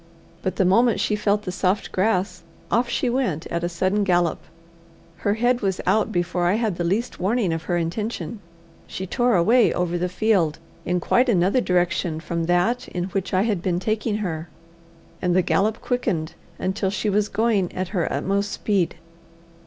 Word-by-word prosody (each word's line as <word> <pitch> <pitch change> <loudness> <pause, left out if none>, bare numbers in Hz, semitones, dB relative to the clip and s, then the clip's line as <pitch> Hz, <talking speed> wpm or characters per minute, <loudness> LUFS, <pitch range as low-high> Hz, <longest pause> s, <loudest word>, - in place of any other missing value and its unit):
But 185 -1 -2
the 190 - +2
moment 230 +5 +4
she 210 - +1
felt 210 0 +1
the 180 - -4
soft 185 +2 0
grass, 185 -2 0 0.3
off 235 +3 +2
she 255 - 0
went 240 - -1
at 170 0 -2
a 175 - 0
sudden 185 +4 0
gallop. 175 -4 +2 0.8
Her 205 0 0
head 245 +2 +1
was 190 -3 -1
out 220 +1 +2
before 175 -1 0
I 180 - +3
had 220 -6 -1
the 175 - -1
least 205 +8 -1
warning 195 -1 +1
of 165 0 -4
her 175 - 0
intention. 210 +6 -3 0.5
She 190 - -5
tore 240 +4 +1
away 225 +7 +4
over 175 -1 -1
the 180 +1 -1
field 185 -5 +1 0.3
in 180 0 0
quite 245 +9 +2
another 195 +4 +3
direction 175 -3 0
from 170 0 -3
that 185 +9 +1
in 180 +1 -4
which 190 0 -3
I 190 +1 +2
had 210 -6 0
been 180 -1 0
taking 215 +2 -1
her, 160 -2 -4 0.7
and 180 -1 +1
the 185 - +4
gallop 210 +5 +1
quickened 190 -11 -1 0.2
until 190 +1 -1
she 210 +2 -2
was 210 0 +1
going 210 -4 +1
at 185 -1 -3
her 185 -4 -1
utmost 200 +1 -1
speed. 195 -5 0
190 Hz, 180 wpm, -23 LUFS, 175-220 Hz, 0.8 s, moment